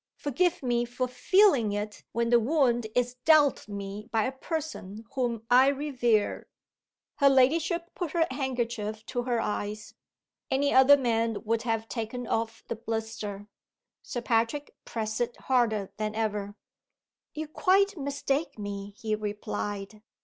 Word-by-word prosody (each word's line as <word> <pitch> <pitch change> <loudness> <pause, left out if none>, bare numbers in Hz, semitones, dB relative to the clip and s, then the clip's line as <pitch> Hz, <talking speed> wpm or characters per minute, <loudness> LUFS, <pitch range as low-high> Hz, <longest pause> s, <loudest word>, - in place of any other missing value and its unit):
Forgive 325 +4 0
me 240 -1 +1
for 245 +1 -2
feeling 255 - +4
it 210 +1 -4
when 235 0 0
the 240 - +7
wound 240 -3 +2
is 245 0 0
dealt 300 -6 +4
me 200 +1 -6
by 225 -1 +2
a 260 - -1
person 265 - -5
whom 240 -4 -1
I 255 +2 +6
revere." 255 -6 +1 0.7
Her 280 -1 +6
ladyship 325 +6 +2
put 350 -4 -4
her 335 -2 +3
handkerchief 235 -5 -3
to 245 - -2
her 240 -1 0
eyes. 210 -1 -3 0.6
Any 280 +2 +2
other 265 +2 +8
man 230 -4 0
would 225 +1 0
have 225 -1 -1
taken 240 +2 -4
off 225 0 -2
the 230 - -4
blister. 220 -3 -4 0.5
Sir 245 - -5
Patrick 230 +5 0
pressed 220 0 -3
it 240 0 -2
harder 225 -6 +1
than 215 0 -2
ever. 205 -2 -2 0.8
"You 310 0 -4
quite 390 +5 +3
mistake 280 -1 -2
me," 200 -1 -6
he 220 -1 -2
replied. 210 0 -4
235 Hz, 140 wpm, -28 LUFS, 215-275 Hz, 0.8 s, other